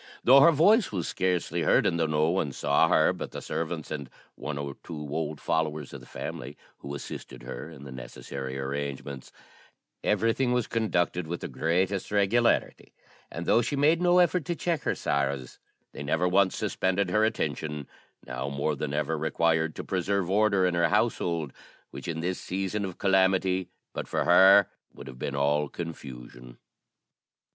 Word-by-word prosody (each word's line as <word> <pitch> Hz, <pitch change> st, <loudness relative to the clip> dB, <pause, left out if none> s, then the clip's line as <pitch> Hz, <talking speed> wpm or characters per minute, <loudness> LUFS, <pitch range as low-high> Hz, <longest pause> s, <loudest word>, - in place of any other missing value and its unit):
Though 135 Hz, +3 st, +8 dB
her 170 Hz, +4 st, +7 dB
voice 200 Hz, -, +4 dB
was 90 Hz, -5 st, -2 dB
scarcely 90 Hz, -2 st, -1 dB
heard, -, -, +3 dB
and 85 Hz, -, +1 dB
though 80 Hz, -, +2 dB
no 75 Hz, +1 st, +2 dB
one 85 Hz, -7 st, -1 dB
saw 75 Hz, +4 st, +3 dB
her 80 Hz, -1 st, +4 dB
but -, -, -6 dB
the -, -, -7 dB
servants 80 Hz, -1 st, -4 dB
and 70 Hz, -4 st, -5 dB, 0.2 s
one 75 Hz, -2 st, -5 dB
or 70 Hz, -1 st, -5 dB
two 85 Hz, -, -7 dB, 0.2 s
old 75 Hz, -1 st, -3 dB
followers 80 Hz, -1 st, -2 dB
of -, -, -7 dB
the -, -, -15 dB
family, 70 Hz, +4 st, -7 dB, 0.2 s
who 70 Hz, 0 st, -6 dB
assisted 65 Hz, -3 st, -8 dB
her 65 Hz, +4 st, -7 dB
in 75 Hz, -4 st, -12 dB
the 70 Hz, -, -9 dB
necessary 65 Hz, +1 st, -7 dB
arrangements, 70 Hz, 0 st, -5 dB, 0.7 s
everything 120 Hz, +2 st, +1 dB
was 125 Hz, -2 st, +1 dB
conducted 90 Hz, -6 st, 0 dB
with 85 Hz, +1 st, -4 dB
the -, -, -4 dB
greatest 95 Hz, +4 st, 0 dB
regularity; 105 Hz, +4 st, +1 dB, 0.3 s
and 85 Hz, +1 st, -6 dB
though 115 Hz, -, +4 dB
she 145 Hz, -, -2 dB
made 155 Hz, +5 st, +3 dB
no 180 Hz, 0 st, +4 dB
effort 180 Hz, -1 st, +3 dB
to 175 Hz, -, -2 dB
check 165 Hz, -2 st, -1 dB
her -, -, +1 dB
sorrows 70 Hz, -3 st, -2 dB, 0.3 s
they -, -, -9 dB
never 80 Hz, +5 st, +1 dB
once 95 Hz, +1 st, +3 dB
suspended 95 Hz, 0 st, 0 dB
her 110 Hz, +3 st, +3 dB
attention, 75 Hz, -8 st, -2 dB, 0.4 s
now 65 Hz, +2 st, -4 dB
more 70 Hz, +2 st, -1 dB
than 75 Hz, +1 st, -3 dB
ever 75 Hz, +2 st, 0 dB
required 80 Hz, 0 st, +1 dB
to -, -, -5 dB
preserve 95 Hz, 0 st, -1 dB
order 100 Hz, -2 st, +3 dB
in 90 Hz, -, +1 dB
her 85 Hz, -1 st, +2 dB
household, 80 Hz, -5 st, 0 dB, 0.4 s
which, -, -, -8 dB
in 80 Hz, -1 st, -3 dB
this 90 Hz, +2 st, -2 dB
season 95 Hz, +2 st, -2 dB
of 95 Hz, -2 st, -7 dB
calamity, 95 Hz, -1 st, +2 dB, 0.2 s
but -, -, -5 dB
for -, -, 0 dB
her 95 Hz, +2 st, +7 dB, 0.2 s
would -, -, -12 dB
have 65 Hz, -2 st, -10 dB
been 70 Hz, -, -3 dB
all 75 Hz, +1 st, +1 dB
confusion. 60 Hz, -7 st, -9 dB
85 Hz, 170 wpm, -27 LUFS, 70-95 Hz, 0.7 s, Though